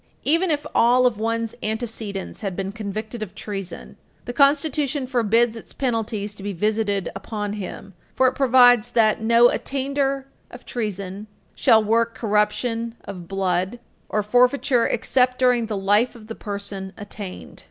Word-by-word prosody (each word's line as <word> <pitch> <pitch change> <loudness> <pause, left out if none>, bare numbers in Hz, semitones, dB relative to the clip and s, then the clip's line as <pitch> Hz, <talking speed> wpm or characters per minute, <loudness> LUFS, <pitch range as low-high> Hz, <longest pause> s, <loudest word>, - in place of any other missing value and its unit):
Even 335 +5 +2
if 295 -2 0
all 245 +2 +4
of 235 -4 +1
one's 230 0 -1
antecedents 220 -3 -4
had 195 -4 -3
been 195 +1 -3
convicted 215 +2 -5
of 200 -3 -6
treason, 195 -3 -7 0.3
the 245 - -5
Constitution 280 0 +2
forbids 235 -2 +2
its 225 - -10
penalties 225 -5 -2
to 205 - -13
be 200 0 -4
visited 205 +1 0
upon 205 +1 -4
him, 200 -1 -7 0.2
for 260 - +3
it 255 - +4
provides 245 -3 +5
that 220 -2 +2
"no 235 +2 +5
attainder 275 0 -1 0.2
of 245 - -12
treason 205 -3 -4 0.3
shall 220 -1 +4
work 230 +2 +1
corruption 230 +2 0
of 180 -3 -8
blood, 190 +2 -1 0.3
or 210 - 0
forfeiture 245 +2 +3
except 255 -1 +1
during 250 -3 +3
the 215 -2 -3
life 205 +6 +2
of 225 -2 -13
the 225 - -6
person 200 -2 -6
attainted." 205 -2 -9
225 Hz, 150 wpm, -23 LUFS, 205-245 Hz, 0.3 s, provides